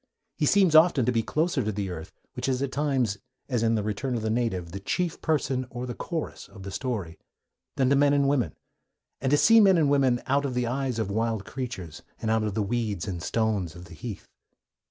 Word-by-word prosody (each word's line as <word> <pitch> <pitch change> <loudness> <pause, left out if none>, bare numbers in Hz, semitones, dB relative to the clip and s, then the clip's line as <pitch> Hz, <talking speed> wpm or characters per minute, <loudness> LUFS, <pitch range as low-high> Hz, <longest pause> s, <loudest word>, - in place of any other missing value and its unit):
He 150 - +1
seems 190 -3 +4
often 155 -5 +6
to 125 - +2
be 115 -2 +2
closer 155 +4 0
to 110 - -1
the 100 -2 -3
earth 90 +2 -7 0.2
(which 130 +1 -2
is 130 +1 0
at 135 - -2
times, 130 -8 0 0.3
as 125 -5 0
in 115 0 +2
The 105 - 0
Return 110 +5 -2
of 115 - -3
the 110 - 0
Native, 110 -8 -1
the 100 - -5
chief 175 - -2
person, 135 -5 0
or 120 +1 -5
the 125 - -4
chorus, 165 +6 -5
of 95 - -12
the 100 - -6
story) 105 -9 -4 0.6
than 130 - +2
to - - +5
men 140 +1 +4
and 140 -1 +3
women, 130 - +1 0.7
and 135 - 0
to 145 - +4
see 225 +8 +7
men 195 -3 +6
and 150 -4 +3
women 135 -4 +3
out 140 +1 +2
of 135 -3 -2
the 125 0 +1
eyes 130 0 -1
of 110 -3 -2
wild 110 -1 -1
creatures, 115 - -6 0.2
and 110 - -1
out 110 0 +2
of 105 -2 -2
the 110 - +1
weeds 105 -3 -2
and 90 -3 -4
stones 105 -6 -1
of 90 +1 -10
the 85 - -13
heath. 100 +4 -7
120 Hz, 230 wpm, -27 LUFS, 105-140 Hz, 0.7 s, see